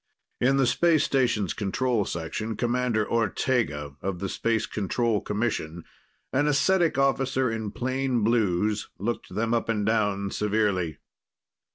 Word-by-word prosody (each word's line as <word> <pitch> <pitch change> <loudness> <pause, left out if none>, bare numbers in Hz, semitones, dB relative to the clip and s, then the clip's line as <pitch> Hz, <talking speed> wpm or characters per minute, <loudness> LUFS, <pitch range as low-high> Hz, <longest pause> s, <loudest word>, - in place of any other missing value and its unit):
In 135 +2 +3
the 135 - +4
space 155 +5 +3
station's 120 -10 +1
control 110 +1 0
section, 110 +7 -4
Commander 120 -3 0
Ortega 110 - 0
of 95 -1 -2
the 95 +1 -4
Space 115 +1 0
Control 110 +2 -1
Commission, 100 -7 -2 0.5
an 145 +3 +2
ascetic 165 +2 +2
officer 135 -2 +1
in 110 -2 -3
plain 130 0 -1
blues, 105 -2 +1
looked 115 +4 -3
them 115 +2 0
up 115 -1 0
and 105 -3 0
down 105 -3 +1
severely. 100 -7 0
115 Hz, 130 wpm, -26 LUFS, 100-125 Hz, 0.5 s, the